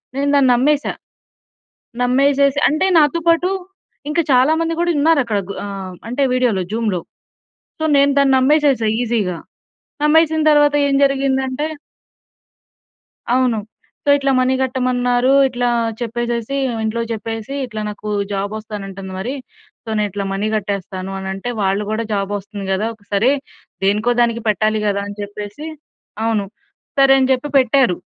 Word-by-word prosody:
నేను 280 +1 0
దాన్ని 270 -2 +4
నమ్మేశా. 285 +4 +1 1.1
నమ్మేసేసి 275 +2 +3
అంటే, 310 +6 +1
నాతో 305 +2 +3
పాటు 335 +2 +3 0.6
ఇంకా 330 +3 +1
చాలా 260 +4 +5
మంది 330 0 0
గూడా 345 0 +1
ఉన్నారక్కడ. 280 -9 +2
గ్ - - -2
ఆహ్, 195 -2 -6
అంటే, 265 +4 -1
వీడియోలో 235 -7 +1
జూమ్‌లో 220 -5 -1 0.8
సో, - - 0
నేను 280 0 +4
దాన్ని 275 -1 +4
నమ్మేసేశా 275 -3 +3
ఈజీగా. 215 -8 -1 0.7
నమ్మేసిన 315 +1 +4
తరవాత 295 -1 +4
ఏం 275 - +1
జరిగిందంటే 270 0 0 1.7
అవును. 250 -3 +2 0.5
సో, - - +1
ఇట్లా 275 -1 0
మనీ 255 +1 +2
గట్టమన్నారు. 250 0 +1 0.2
ఇట్లా 245 -1 -2 0.3
చెప్పేసేసీ, 240 +2 -2 0.3
ఇంట్లో 225 +1 -1
చెప్పేసీ, 225 +2 -5
ఇట్లా 215 -3 -6
నాకు 210 0 -7 0.2
జాబొస్తానంటంది 200 -1 -5
మరీ, 245 +8 -3 0.5
సో, - - -29
నే 210 - +1
ఇట్లా 200 +1 -4
మనీ 205 +2 -1
కట్టేస్తాను 195 -2 -4
అనంటే, 190 +4 -5
వాళ్ళు 195 +1 +1
గూడా 220 +1 -1
జాబొస్తుంది 200 0 -4
గదా! 205 +4 0
ఒక 205 -2 -28
సరే. 230 +7 +3 0.5
దేనికో 215 +5 +2
దానికి 235 -1 0
పెట్టాలి 215 +1 +1
గదా! 200 0 0
అని 205 - -8
చెప్పేసి 205 +7 -7 0.6
అవును. 220 -3 0 0.5
సరే 270 0 +6
అని 260 0 +2
జెప్పి 260 +3 0
పెట్టారు. 255 -6 +3
240 Hz, 130 wpm, -18 LUFS, 205-275 Hz, 1.7 s, సరే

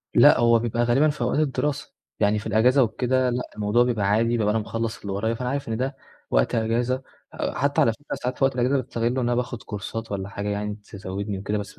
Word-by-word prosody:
لأ - - +7
هو 115 -1 +5
بيبقى 120 +1 0
غالبًا 135 +6 +3
في 145 - -5
أوقات 125 +5 +1
الدراسة. 145 0 -1 0.3
يعني 105 0 +2
في 110 - -6
الإجازة 125 +6 +4
وكده، 125 +3 +1
لأ 125 +1 -1
الموضوع 105 +3 +2
بيبقى 115 -5 0
عادي 110 +3 +3
بيبقى 105 -2 +1
أنا 110 - +1
مخلّص 115 +1 -3
اللي 100 -1 -4
ورايا، 110 +4 0
فأنا 125 +1 -3
عارف 140 -1 -3
إن 110 - -1
ده 135 +3 -2 0.4
وقت - - +2
أجازة، 120 +3 0 0.3
آآ - - -3
حتى 140 +1 +1
على 115 - +4
فكرة 145 +6 -7
ساعات 125 +1 -4
في - - -1
وقت 135 -1 +3
الأجازة، 125 +3 +2
باستغلّه 115 -2 -2
إن 125 +2 -1
أنا 120 -1 +1
باخد 125 -1 -3
كورسات 110 +2 -6
والّا 100 -1 -3
حاجة 105 +1 -4
يعني، 105 0 -2
تزودني 100 -1 -6
وكده، 105 +2 -2
بس 100 -1 -5
115 Hz, 230 wpm, -24 LUFS, 105-125 Hz, 0.4 s, لأ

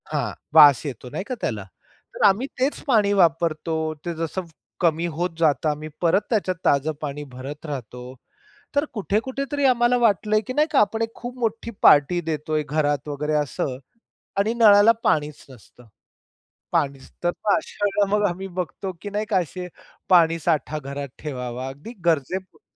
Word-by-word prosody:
हां. - - -2 0.2
वास 145 -4 +8
येतो 130 -3 -6
नाही 190 - -4
का 255 - -3
त्याला? 105 -3 -2 0.5
तर - - -3
आम्ही 210 +7 +2
तेच 265 +3 0
पाणी 215 -6 +3
वापरतो, 165 -3 +2 0.3
ते 170 - -2
जसं 165 +3 -3 0.4
कमी 170 -1 +1
होत 175 +3 -1
जातं 155 -1 +2
आम्ही 150 +1 -4
परत 175 +3 +3
त्याच्यात 200 -5 0
ताजं 145 +2 +3
पाणी 150 -1 -4
भरत 140 +5 -8
राहतो. 125 -3 -7 0.6
तर 285 +1 +2
कुठे-कुठे 230 +5 -2
तरी 285 -1 0
आम्हाला 245 -1 +4
वाटलंय, 215 -2 +2
की 255 - -3
नाही 300 +3 +3
का? 285 - +4
आपण 210 +2 +1
एक 225 0 -2
खूप 245 +1 -8
मोठी 230 0 -2
पार्टी 145 +4 +6
देतोय 155 0 -1
घरात 145 -1 -1
वगैरे 150 +1 -2
असं 145 -3 -2 0.6
आणि 215 +3 +1
नळाला 215 -2 +7
पाणीच 150 -1 0
नसतं. 125 -1 -17 0.8
पाणीच 140 -2 -1
तर 175 - +3 0.2
मग 205 - +4
अशा 210 -1 -4
वेळेला 200 0 +2
मग 210 - +1
आम्ही 185 +2 -5
बघतो, 185 +1 -5
की 205 - -5
नाही 210 +1 -2
का? 200 - +2
असे, 180 +1 -5 0.4
पाणी 165 -2 +5
साठा 155 -1 0
घरात 140 0 -6
ठेवावा 125 -3 -5
अगदी 145 - -9
गरजे 165 +1 +1
पुरतं. 190 - -25
170 Hz, 165 wpm, -23 LUFS, 145-210 Hz, 0.8 s, वास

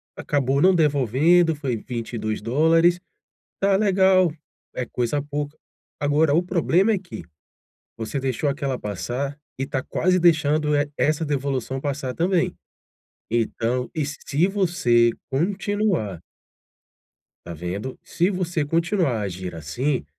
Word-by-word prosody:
acabou 140 -1 0
não 185 +2 +5
devolvendo, 155 +3 +3
foi 140 -5 -2
$22. 125 +10 +1 0.6
Tá 195 0 +3
legal, 190 -4 +4 0.4
é 125 - -3
coisa 125 +4 -1
pouca. 145 +1 -4 0.4
Agora 145 +1 +2
o 165 - +4
problema 180 +3 +2
é - - +1
que, 180 - -8 0.7
você 115 +5 -3
deixou 135 +2 -1
aquela 135 -2 -2
passar 125 +8 -4 0.2
e 135 - 0
tá 130 -3 -2
quase 185 +2 +1
deixando 155 -3 +3
e 145 0 +1
essa 155 +1 +1
devolução 135 -2 -2
passar 135 -2 -3
também. 180 +1 +1 0.8
Então, 120 +2 -1
e 155 -2 0
se 145 +3 -1
você 165 - +2 0.2
continuar 185 - -1 1.3
Tá 85 - -6
vendo? 90 +10 -5
Se 175 +4 0
você 175 -4 -1
continuar 165 - +1
a - - -3
agir 95 -2 -5
assim, 125 - -2
145 Hz, 120 wpm, -23 LUFS, 125-175 Hz, 1.3 s, não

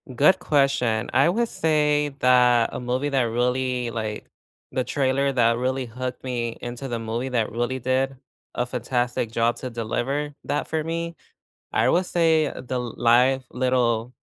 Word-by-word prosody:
Good 150 +9 +5
question. 130 -6 +1
I 140 +6 +4
would 235 +5 +1
say 150 -3 +1
that 125 -2 +4
a - - -4
movie 125 +3 -1
that 135 -2 +2
really, 125 +1 0
like 110 -2 -4 0.4
the 130 - 0
trailer 140 +1 +1
that 115 -2 +3
really 130 +1 -1
hooked 125 +2 -6
me 120 -3 -3
into 120 +3 -6
the 120 -2 -3
movie, 115 +3 -3
that 115 -4 0
really 120 +3 -1
did 130 +2 0 0.4
a 125 - 0
fantastic 120 -1 -2
job 115 0 +1
to 130 - -5
deliver 130 +6 -2
that 145 - -1
for 160 -1 -1
me, 170 +1 -3 0.6
I - - +2
would 180 +2 +2
say 160 -3 +3
the 130 0 -4
live, 125 +2 +2
Little 125 -2 +1
125 Hz, 155 wpm, -24 LUFS, 120-140 Hz, 0.6 s, Good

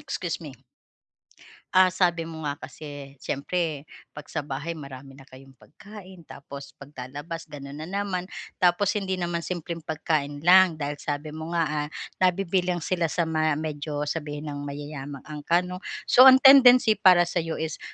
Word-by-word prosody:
excuse 175 -1 -4
me. 145 -5 -10 1.2
Ah, 185 0 +6
sabi 175 -2 0
mo 160 -1 -8
nga 145 0 -3
kasi, 145 -2 -10
syempre 155 0 -3 0.3
'pag 150 -1 -10
sa 160 - -4
bahay 150 +4 -5
marami 135 -2 -10
na 135 - -14
kayong 135 0 -16
pagkain 190 +1 -14
tapos 140 0 -11
paglalabas 145 +4 -8
ganun 140 0 -9
na 160 - -7
naman, 195 -1 -3 0.3
tapos 180 +2 +3
hindi 190 -2 -2
naman 175 -1 -2
simpleng 170 -1 -5
pagkain 155 -2 -2
lang 185 -1 +6
dahil 145 -1 -4
sabi 145 +1 -4
mo 160 +1 -7
nga, 165 -1 +2 0.2
ah, - - -11 0.3
nabibilang 185 -1 +1
sila 175 -3 0
sa 170 +3 0
ma 155 -1 +1
medyo 150 -1 -4
sabihin 150 -1 -4
nang 145 0 -6
mayayamang 145 -1 -7
angkan 155 +4 0
'no. 180 0 -6 0.3
So, 255 +2 +7
ang 260 0 +8
tendency 255 -4 +8
para 185 -4 +6
sa'yo 165 -2 -2
is 160 0 -4
160 Hz, 155 wpm, -25 LUFS, 145-180 Hz, 1.2 s, ang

